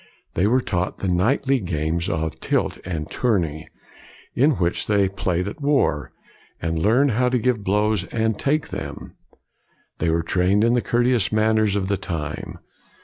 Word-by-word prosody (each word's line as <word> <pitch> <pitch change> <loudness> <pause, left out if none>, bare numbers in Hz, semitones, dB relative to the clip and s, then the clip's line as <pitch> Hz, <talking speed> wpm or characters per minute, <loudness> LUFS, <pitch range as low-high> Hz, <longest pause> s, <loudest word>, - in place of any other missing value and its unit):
They 95 - +2
were 125 +4 +3
taught 90 -5 -2
the 95 - -3
knightly 125 +9 +2
games 85 -2 -2
of 80 0 -2
tilt - - -1
and 80 -4 -4
tourney, 85 -11 0 0.7
in 145 +5 +3
which 90 -7 -1
they 100 -2 +3
played 90 -1 -2
at 105 - -7
war, 135 - +1 0.5
and 80 0 -2
learned 125 +8 +3
how 125 +3 +2
to 125 - +1
give 120 -3 0
blows 105 -1 +1
and 110 +1 -1
take 150 +2 0
them. - - -7 0.9
They 85 - +1
were 85 +1 +1
trained 95 +5 +2
in 115 +1 +3
the 125 - +2
courteous 120 -4 +1
manners 110 -1 +2
of 95 -2 -1
the 100 0 0
time. 80 -6 -5
100 Hz, 160 wpm, -22 LUFS, 85-120 Hz, 0.9 s, were